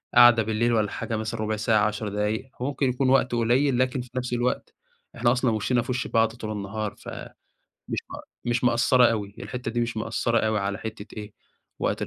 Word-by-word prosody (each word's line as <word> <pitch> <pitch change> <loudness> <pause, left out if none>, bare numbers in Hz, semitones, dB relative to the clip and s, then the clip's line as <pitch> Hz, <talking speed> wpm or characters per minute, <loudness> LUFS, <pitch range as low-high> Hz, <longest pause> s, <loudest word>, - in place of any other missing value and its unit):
قعدة 120 -2 +8
بالليل 115 +2 +1
والّا 105 -2 +1
حاجة 115 - -3
مثلًا 110 +1 -4
ربُع 110 0 -1
ساعة، 105 0 +2
10 105 0 -3
دقايق، 105 +6 -2
هو - - -1
ممكن 140 -2 0
يكون 130 +1 +1
وقت 130 -1 +3
قليل، 125 +3 +2
لكن 130 0 +1
في 125 - -11
نفس 125 -1 -2
الوقت 120 +1 -1 0.4
إحنا 120 0 +3
أصلًا 125 -1 +2
وِشِّنَا 120 +3 +1
في 125 - -4
وِشّ 125 0 -2
بعض 115 0 +3
طول 110 -3 -5
النهار، 105 +1 -4
ف - - -10 0.8
مش - - -1
ما - - -7 0.2
مش 120 +1 0
مأثرة 120 +1 +4
أوي، 105 -2 -4
الحِتّه 125 -2 -5
دي 120 - -1
مش 120 -1 -2
مأثرة 115 +1 0
أوي 110 -1 +1
على 100 +1 -2
حِتّة 110 -1 -7
إيه 105 -1 -7 0.5
وقت - - -1
115 Hz, 205 wpm, -25 LUFS, 110-125 Hz, 0.8 s, قعدة